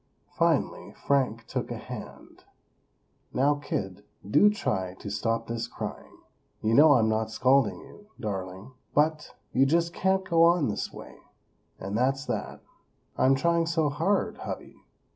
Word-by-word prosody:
Finally - - 0
Frank 130 -5 0
took - - -4
a - - -4
hand: - - -10 0.9
"Now, 140 +3 +3
kid, 100 -9 -4 0.2
do 205 - +5
try 95 - -2
to 100 - -8
stop 115 0 -1
this 115 0 -4
crying! - - -7 0.5
You 110 +1 +2
know 150 +3 +7
I'm 115 -5 +3
not 110 0 0
scolding 130 +1 +2
you, 205 - -16
darling, 95 +1 -5 0.2
but, 150 +1 +1 0.2
you 135 +1 +4
just 170 +3 +1
can't 190 +1 +1
go 165 -1 +3
on 170 -5 +4
this 105 - -3
way; - - -12 0.6
and 100 +2 -5
that's 135 +3 +1
that!" - - -4 0.5
"I'm 135 +1 +4
trying 170 +4 +1
so 165 -3 +1
hard, 165 +8 0
hubby!" - - -7
135 Hz, 145 wpm, -27 LUFS, 110-160 Hz, 0.9 s, know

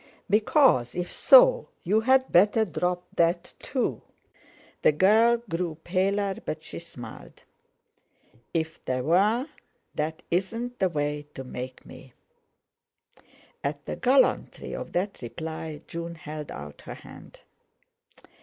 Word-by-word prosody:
Because, 210 - +4
if 180 0 -3
so, - - +6
you'd 220 +8 +4
better 210 +5 +5
drop 180 -1 -2
that 170 +1 +1
too." - - -2 0.8
The - - +5
girl 220 +8 +5
grew 170 -3 -3
paler, 195 +2 0
but 155 0 -5
she - - -7
smiled. 165 -8 -11 1.1
"If 160 -1 -3
there 130 -1 -1
were, 205 - +3 0.5
that 155 +1 -3
isn't 230 +8 -2
the 190 - +2
way 150 -2 -2
to 135 - -6
make 125 0 -7
me." 130 - -13 1.5
At 145 +1 -3
the - - -4
gallantry 265 +1 +2
of - - -6
that 195 +3 -2
reply, 160 +3 -6
June 170 0 -6
held 150 -1 -7
out 75 0 -9
her - - -8
hand. - - -14
175 Hz, 115 wpm, -27 LUFS, 150-210 Hz, 1.5 s, so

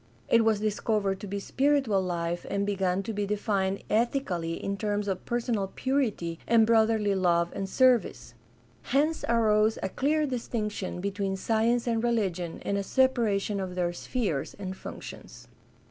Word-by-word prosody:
It 230 -1 +5
was 220 -2 +2
discovered 210 -2 0
to 205 - -7
be 200 +1 -3
spiritual 265 -3 +1
life 175 -1 -2
and 200 0 0
began 195 -2 0
to 225 - -4
be 205 -1 -2
defined 200 -2 -1
ethically 210 -8 0
in 200 +3 -3
terms 205 0 -2
of 190 -2 -3
personal 235 -4 -1
purity 225 -12 -1
and 230 -1 +5
broth 225 -1 +4
erly 210 -3 +1
love 175 -2 +2
and 195 -1 -4
service. 245 - +2 0.5
Hence 300 - +1
arose 220 -2 +3
a 190 - -1
clear 300 +8 +1
distinction 215 -8 -3
between 200 0 -2
science 230 +4 +1
and 230 -1 0
religion 190 -8 -1
and 200 0 -1
a - - -2
separation 215 -4 +1
of 185 -2 -4
their 175 -1 0
spheres 185 - -2
and 190 -2 -5
functions. - - -10
205 Hz, 155 wpm, -28 LUFS, 190-230 Hz, 0.5 s, It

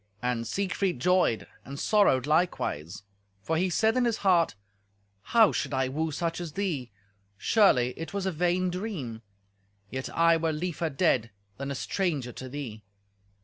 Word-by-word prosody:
And 120 -2 -1
Siegfried 195 - -1
joyed, 180 -6 +2 0.2
and 140 +1 -8
sorrowed 200 -12 +3
likewise, 145 - 0 0.4
for 160 - -1
he 180 +3 +1
said 220 +6 +2
in 255 -1 +2
his 230 -2 +1
heart, 175 - +4 0.7
"How 225 - +4
should - - -2
I 130 -1 +1
woo 160 +4 -1
such 165 +3 -2
as 165 -4 -6
thee? 165 -11 -2 0.5
Surely 125 - +4
it 165 -1 -6
was 200 -1 -3
a 190 - +1
vain 180 +2 +1
dream; 175 - -5 0.7
yet 130 0 -4
I 165 0 +4
were 160 -1 0
liefer 165 +1 -2
dead 135 -6 +1 0.3
than 140 +1 -4
a 140 - -3
stranger 150 -6 -1
to 130 +2 -8
thee." 125 -6 -6
165 Hz, 155 wpm, -28 LUFS, 130-185 Hz, 0.7 s, heart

